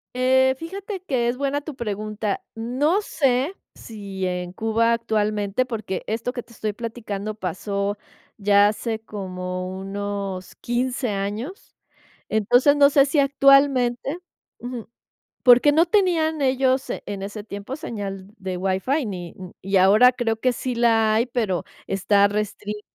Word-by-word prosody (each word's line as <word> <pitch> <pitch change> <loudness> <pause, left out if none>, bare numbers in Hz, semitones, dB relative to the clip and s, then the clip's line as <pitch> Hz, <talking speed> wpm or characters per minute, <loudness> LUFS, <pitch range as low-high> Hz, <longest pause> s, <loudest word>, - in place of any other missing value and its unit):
Eh, 260 +1 +3
fíjate 385 +4 -6
que 255 -9 0
es 250 - -2
buena 280 +1 -1
tu 300 -1 -8
pregunta. 215 -3 -3
No 260 - 0
sé 275 -1 0 0.2
si 200 -4 -6
en 180 -1 -3
Cuba 225 +4 +1
actualmente, 215 0 0
porque 215 -6 -4
esto 230 +3 -3
que 245 - -5
te - - -22
estoy 215 -2 -3
platicando 215 -2 -5
pasó 200 +1 -3 0.4
ya 205 0 +5
hace 220 +1 -2
como 185 -3 -5
unos 195 -1 -5
15 245 0 -2
años. 210 - -5 0.5
Entonces, 245 +7 +4
no 285 -1 +7
sé 275 -2 +5
si 290 +2 0
actualmente 275 0 +3 0.4
Ujú. 245 -2 -7 0.5
Porque 250 +4 +7
no 325 +4 +4
tenían 335 -5 +2
ellos 260 0 +2
en 200 -1 -5
ese 205 +1 -6
tiempo 205 +5 -6
señal 200 - -6
de 185 -1 -4
WiFi 195 - 0
ni, 180 -4 -6
mm, 185 -1 -9
y 195 +1 +1
ahora 210 +7 +6
creo 235 -3 -1
que 255 +3 +1
sí 250 +1 -4
la 225 -2 +3
hay, 230 +3 +2
pero 220 -8 -1 0.2
está 200 +1 +3
restringida. 210 0 -4
225 Hz, 140 wpm, -23 LUFS, 200-260 Hz, 0.5 s, no